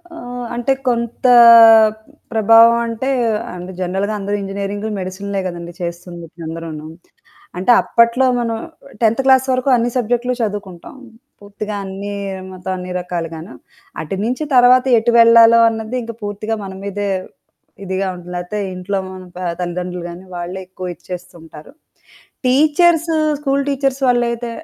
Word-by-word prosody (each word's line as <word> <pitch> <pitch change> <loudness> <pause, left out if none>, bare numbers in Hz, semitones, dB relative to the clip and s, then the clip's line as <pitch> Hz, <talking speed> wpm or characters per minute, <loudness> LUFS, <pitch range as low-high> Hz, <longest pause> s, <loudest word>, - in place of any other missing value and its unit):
ఆహ్, 245 -5 -7
అంటే 240 +3 0
కొంత 235 0 -2 1.1
ప్రభావం 225 +1 +6
అంటే, 230 +4 -3 0.5
అంటే 180 +1 -8
జనరల్‌గా 190 +4 -2
అందరూ 200 +1 -2
ఇంజినీరింగ్‌లు, 200 +2 -4
మెడిసిన్‌లే 195 +2 -4
గదండీ 170 -1 -7
చేస్తుందిప్పుడు 170 -1 -8
అందరూను. 160 -2 -7 0.7
అంటే 190 +7 +2
అప్పట్లో 235 +3 +2
మనం 230 -1 -2 0.5
10త్ 230 +3 +2
క్లాస్ 265 0 +4
వరకు 255 +2 0
అన్ని 240 0 0
సబ్జెక్ట్‌లు 245 +1 0
చదువుకుంటాం. 205 -2 -5 0.5
పూర్తిగా 205 +1 -6
అన్ని 195 +1 -6 0.4
మొత్తం 185 0 -6
అన్ని 180 0 -7
రకాలుగాను. 170 0 -6 0.5
అటు 160 +5 -5
నుంచి 250 +6 -2
తర్వాత 250 +1 +6
ఎటు 235 +2 0
వెళ్లాలో 230 0 +7
అన్నది 220 +2 -5
ఇంకా 230 0 -8
పూర్తిగా 205 +2 -3
మన 195 - -7
మీదే 200 0 -3 0.8
ఇదిగా 190 +1 -2
ఉంటుంది. 180 0 -11
లేదా 175 +4 -4 0.2
ఇంట్లో 185 +2 -3
మన 185 0 -9 0.4
తల్లిదండ్రులు 180 0 -4
గానీ 175 +2 -10
వాళ్ళే 175 +2 -5
ఎక్కువ 185 -1 -7
ఇచ్చేస్తుంటారు. 165 - -11 0.7
టీచర్స్, 310 +5 +3 0.3
స్కూల్ 280 -1 0
టీచర్స్ 275 -1 -1
వాళ్ళయితే 240 -1 0
205 Hz, 125 wpm, -17 LUFS, 180-240 Hz, 1.1 s, వెళ్లాలో